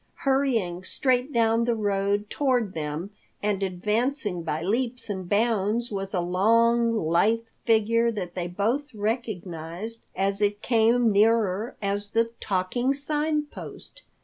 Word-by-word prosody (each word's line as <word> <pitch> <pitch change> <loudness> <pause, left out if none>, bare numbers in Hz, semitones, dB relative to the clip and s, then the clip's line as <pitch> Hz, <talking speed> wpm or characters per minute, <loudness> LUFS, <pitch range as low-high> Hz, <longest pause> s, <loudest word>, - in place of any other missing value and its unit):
Hurrying 235 -10 +1
straight 255 +6 0
down 230 -1 +2
the 235 -1 +1
road 205 -1 0
toward 250 -8 +1
them, 155 +4 -4 0.3
and 205 -2 0
advancing 210 - -1
by 160 -1 -3
leaps 235 +4 -1
and 185 -3 -5
bounds 220 +2 +1
was 195 -1 -3
a 185 - 0
long, 230 +6 +3
lithe 215 +8 +2 0.2
figure 230 +1 +3
that 185 -5 -5
they 175 -2 -3
both 230 +9 -1
recognized 205 -2 -4
as 195 +1 0
it 205 +1 0
came 230 0 +3
nearer 215 0 +2
as 200 +1 -2
the 230 +1 +1
Talking 215 +8 0
Sign 300 +2 0
Post. 295 - -10
215 Hz, 130 wpm, -26 LUFS, 195-235 Hz, 0.3 s, long